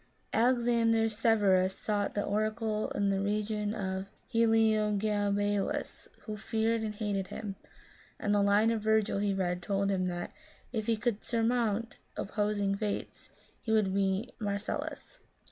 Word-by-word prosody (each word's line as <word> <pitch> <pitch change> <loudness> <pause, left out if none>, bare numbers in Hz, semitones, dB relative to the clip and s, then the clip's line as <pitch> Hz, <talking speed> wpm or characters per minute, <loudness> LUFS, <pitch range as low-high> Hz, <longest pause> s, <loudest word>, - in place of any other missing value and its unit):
Alexander 235 -1 +3
Severus 205 -4 +3
sought 205 -2 -1
the 205 - 0
oracle 215 +1 -1
in 200 -1 +2
the 195 0 0
reign 210 +1 -1
of 190 -2 -3 0.3
Heliogabalus, 210 -2 +1 0.2
who 215 - -5
feared 225 +1 0
and 215 -1 -3
hated 205 -3 -2
him; 205 -1 -6 0.6
and 205 - 0
the 205 - +4
line 205 +3 +4
of 225 -2 -1
Virgil 220 -1 +2
he 205 0 +1
read 180 -2 -1
told 195 +1 0
him 185 -1 0
that 175 -1 -4 0.2
" - - -31
if 220 -2 -2
he 230 -1 +2
could 215 -1 -1
surmount 230 -1 0 0.2
opposing 205 -1 0
fates, 205 0 -4 0.3
he 220 - -3
would 210 -4 +3
be 195 +4 0
Marcellus." 205 - -4
210 Hz, 140 wpm, -31 LUFS, 200-225 Hz, 0.6 s, the